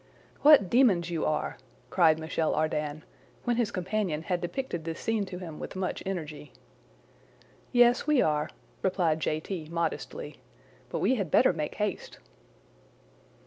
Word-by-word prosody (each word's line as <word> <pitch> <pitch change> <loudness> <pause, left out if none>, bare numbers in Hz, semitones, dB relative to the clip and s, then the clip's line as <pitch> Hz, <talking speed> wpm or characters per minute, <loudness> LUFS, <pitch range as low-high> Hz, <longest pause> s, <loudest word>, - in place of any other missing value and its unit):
"What 290 -9 +7
demons 190 -7 +3
you 165 -2 -1
are!" 155 - -1 0.3
cried 160 -3 +5
Michel 160 0 -1
Ardan, 155 -1 -1 0.4
when 240 -1 0
his 235 -4 +1
companion 185 -4 -2
had 180 0 -1
depicted 175 -1 -3
this 165 0 -5
scene 225 -2 0
to 185 -1 -7
him 165 -4 -8
with - - -7
much 185 0 -2
energy. 150 -7 -5 1.2
"Yes, 245 +2 +4
we 300 -3 +4
are," 150 -3 +1 0.3
replied 175 -4 +1
J. 155 0 0
T. 160 -1 -6
modestly; 170 -1 -3 0.5
"but - - -3
we 225 - +3
had 195 -6 -2
better - - +5
make 150 -1 -4
haste." 210 -3 -3
175 Hz, 145 wpm, -28 LUFS, 155-205 Hz, 1.2 s, What